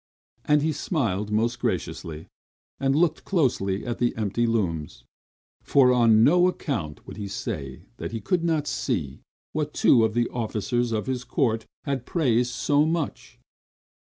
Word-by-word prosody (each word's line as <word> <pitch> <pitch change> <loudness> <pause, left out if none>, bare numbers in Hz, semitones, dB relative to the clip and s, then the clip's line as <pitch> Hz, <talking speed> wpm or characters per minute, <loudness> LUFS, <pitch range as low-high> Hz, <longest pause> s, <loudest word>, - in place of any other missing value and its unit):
And 150 -1 +3
he 160 - +1
smiled 105 - -1
most 115 +3 0
graciously, 80 -8 -3 0.5
and 135 0 +1
looked 165 0 +2
closely 110 - 0
at 120 -1 -3
the 120 - +1
empty 110 +2 0
looms; 85 - -2 0.6
for 130 -2 +4
on 115 -3 +5
no 175 +7 +5
account 115 - -3
would - - -10
he 100 -1 -4
say 80 - -5
that - - -5
he 115 - -3
could 170 - 0
not 160 -3 +1
see 85 - -2 0.3
what 150 -1 -2
two 115 - +5
of 110 0 0
the 120 0 +2
officers 120 +1 -1
of 110 -1 -1
his 130 -2 -2
court 115 -5 0 0.2
had 135 -4 -3
praised 125 -7 +1
so 145 +3 +2
much. 160 -1 -3
120 Hz, 155 wpm, -25 LUFS, 105-145 Hz, 0.6 s, on